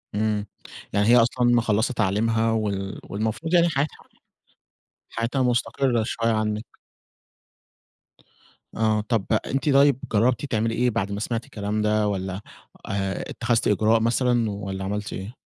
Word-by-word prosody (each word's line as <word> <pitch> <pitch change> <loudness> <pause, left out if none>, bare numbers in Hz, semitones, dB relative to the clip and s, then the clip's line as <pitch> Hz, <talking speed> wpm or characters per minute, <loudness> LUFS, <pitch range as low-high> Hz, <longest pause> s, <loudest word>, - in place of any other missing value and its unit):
إمم، 105 -1 0 0.5
يعني 100 +1 +2
هي 120 +2 +7
أصلًا 125 +1 +2
مِخَلّصة 115 +1 +1
تعليمها 110 +2 +1
وال 100 -3 -2
والمفروض 110 - -3
يعني 170 -1 +5
حياتها 145 +1 -1 1.1
حياتها 115 +4 -2
مستقرة 125 -1 +1
شوية 115 0 0
عنِك. 110 0 -1 2.1
آه، 110 -1 +1
طَب، 110 -2 -1 0.2
أنتِ 135 +2 -1
طيب، 140 -1 +5
جربتِ 120 +6 +2
تعملي 115 -3 -1
إيه 125 +1 +2
بعد 100 -4 -2
ما 100 - -3
سمعتِ 115 +1 -3
الكلام 105 0 -3
ده 105 0 +2
والّا 95 -1 -3 0.5
آآ، 95 -1 -2
اتخذتِ 120 -1 0
إجراء 110 +2 +3
مثلًا 115 -1 +1
والّا 95 -1 -5
عملتِ 105 +2 -3
إيه؟ 100 +7 -7
110 Hz, 130 wpm, -24 LUFS, 105-120 Hz, 2.1 s, هي